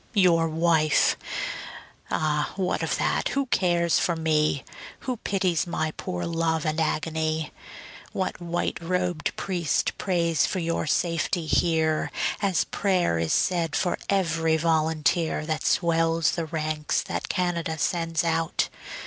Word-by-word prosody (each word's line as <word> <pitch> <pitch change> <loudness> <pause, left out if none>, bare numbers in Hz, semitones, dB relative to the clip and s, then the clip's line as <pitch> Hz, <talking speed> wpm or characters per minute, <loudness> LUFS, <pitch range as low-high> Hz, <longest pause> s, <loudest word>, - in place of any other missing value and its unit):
Your 170 -4 +4
wife? 160 -2 +3 0.9
Ah, 150 -2 0
what 185 -1 -1
of - - 0
that, - - 0
who 275 0 0
cares 175 -7 +2
for 170 - +1
me? 155 -3 +1 0.4
Who 255 -2 -3
pities 185 -5 0
my 160 -2 -1
poor 90 -11 -4
love 165 -1 0
and 155 +1 0
agony? 160 0 -1 0.6
What 185 -1 -3
white 175 0 -2
robed 180 -2 -1
priest 175 -5 0
prays 170 -4 +1
for - - -2
your 165 -2 -1
safety 165 +2 0
here, 160 -1 +2 0.3
As 195 -5 +2
prayer 180 - +1
is 80 -1 0
said 170 -3 +1
for 180 - +1
every 165 -4 +2
volunteer 160 0 +1
That 155 -1 -2
swells 165 -2 +2
the 165 -2 -3
ranks 155 -1 -1
that - - -4
Canada 170 -3 -1
sends 165 +1 0
out? 165 -1 0
165 Hz, 130 wpm, -26 LUFS, 155-175 Hz, 0.9 s, Your